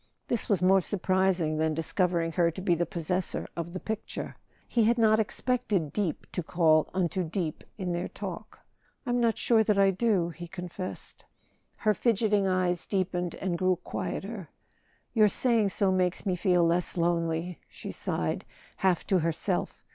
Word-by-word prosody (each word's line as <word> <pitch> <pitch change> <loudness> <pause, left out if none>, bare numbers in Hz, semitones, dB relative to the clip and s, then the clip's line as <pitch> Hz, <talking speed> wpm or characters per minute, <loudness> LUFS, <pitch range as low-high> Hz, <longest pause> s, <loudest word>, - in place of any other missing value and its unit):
This 235 - 0
was 195 -4 +2
more 190 +1 +5
surprising 185 -4 +1
than 160 0 +1
discovering 170 0 +1
her 170 0 +2
to 170 - -7
be 180 - +3
the 170 +1 0
possessor 180 0 -1
of 170 0 -4
the 185 - -5
picture; 220 +2 -5 0.3
he 230 -3 +2
had 235 +2 +3
not 220 -1 +4
expected 215 - -1
deep 195 -7 -2
to 180 - -2
call 160 -2 +3
unto 185 0 0
deep 165 -1 -3
in 185 -3 -2
their 175 +1 -2
talk. - - -7 0.5
"I'm 245 -1 +1
not 230 -3 +2
sure 225 -2 +4
that 210 -1 +1
I 195 -1 +5
do," 190 -4 +1
he 170 +1 -8
confessed. 180 +1 -7 0.5
Her 215 -1 +2
fidgeting 210 -3 +2
eyes 185 -2 0
deepened 180 -3 -1
and 180 -3 -2
grew 185 0 +3
quieter. 190 +1 -5 0.6
"Your 215 -3 +6
saying 225 -1 +2
so 195 0 +1
makes 185 -1 0
me 185 -2 +1
feel 180 -2 +3
less 175 +2 +1
lonely," 170 0 0
she - - -7
sighed, - - -2 0.3
half 185 -3 +1
to 190 - +2
herself. 165 -1 -2
185 Hz, 160 wpm, -28 LUFS, 170-205 Hz, 0.6 s, Your